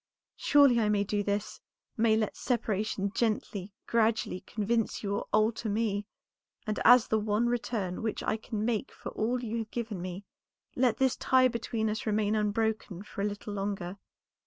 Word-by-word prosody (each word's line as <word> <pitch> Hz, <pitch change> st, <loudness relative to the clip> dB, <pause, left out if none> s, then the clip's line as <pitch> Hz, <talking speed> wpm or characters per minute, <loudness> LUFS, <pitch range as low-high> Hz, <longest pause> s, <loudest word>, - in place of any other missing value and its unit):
Surely 280 Hz, -5 st, +5 dB
I 215 Hz, -2 st, +2 dB
may 205 Hz, -1 st, +2 dB
do 205 Hz, +1 st, -1 dB
this; 205 Hz, 0 st, -2 dB, 0.3 s
may 220 Hz, -1 st, +3 dB
let 215 Hz, -1 st, -1 dB
separation 210 Hz, -4 st, -1 dB
gently, 210 Hz, -4 st, -1 dB
gradually 225 Hz, -4 st, +1 dB
convince 225 Hz, +3 st, -1 dB
you 200 Hz, -1 st, -1 dB
or -, -, -3 dB
alter 215 Hz, +1 st, +2 dB
me; 205 Hz, -1 st, -1 dB, 0.6 s
and 215 Hz, -1 st, -2 dB
as 245 Hz, 0 st, +7 dB
the 220 Hz, -, +2 dB
one 210 Hz, +2 st, +1 dB
return 230 Hz, -6 st, -2 dB
which 220 Hz, -1 st, -2 dB
I -, -, +1 dB
can 220 Hz, -1 st, -4 dB
make 235 Hz, +1 st, -1 dB
for -, -, -8 dB
all 240 Hz, +3 st, -1 dB
you 230 Hz, 0 st, -2 dB
have 220 Hz, -1 st, -5 dB
given 220 Hz, -6 st, -4 dB
me, 185 Hz, +2 st, -6 dB, 0.5 s
let 245 Hz, -3 st, +2 dB
this 265 Hz, -2 st, +2 dB
tie 255 Hz, -1 st, +4 dB
between 230 Hz, -1 st, -2 dB
us 215 Hz, +1 st, -3 dB
remain 210 Hz, 0 st, +1 dB
unbroken 215 Hz, -2 st, -1 dB
for 205 Hz, -, -7 dB
a -, -, +1 dB
little 205 Hz, 0 st, -4 dB
longer. 195 Hz, -2 st, -3 dB
215 Hz, 170 wpm, -30 LUFS, 205-230 Hz, 0.6 s, as